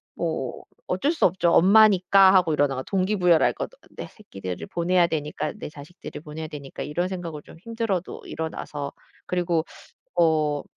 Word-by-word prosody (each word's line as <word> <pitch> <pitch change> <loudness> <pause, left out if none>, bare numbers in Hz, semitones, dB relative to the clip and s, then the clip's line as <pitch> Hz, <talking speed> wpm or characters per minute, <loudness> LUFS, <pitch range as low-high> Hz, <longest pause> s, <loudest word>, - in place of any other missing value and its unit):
뭐 - - -3 0.2
어쩔 295 - +1
수 330 - +1
없죠. 175 -1 +2
'엄마니까.' 195 0 +6
하고 175 -4 +4
일어나 145 -2 +1
가 130 - -4
동기부여를 185 -3 +2
할 - - +3
거 - - -4 0.3
'내 - - -6
새끼들을 95 - -8
보내야 175 0 +2
되니까 150 -2 -3
내 - - -6
자식들을 150 +2 -10
보내야 155 +1 -7
되니까.' 145 -3 -8
이런 170 +5 -2
생각을 170 -5 -6
좀 160 - -15
힘들어도 225 -4 -3
일어나서 150 -3 -5 0.3
그리고 175 -2 0 0.6
어 155 -3 +2
170 Hz, 350 characters per minute, -24 LUFS, 150-190 Hz, 0.6 s, 엄마니까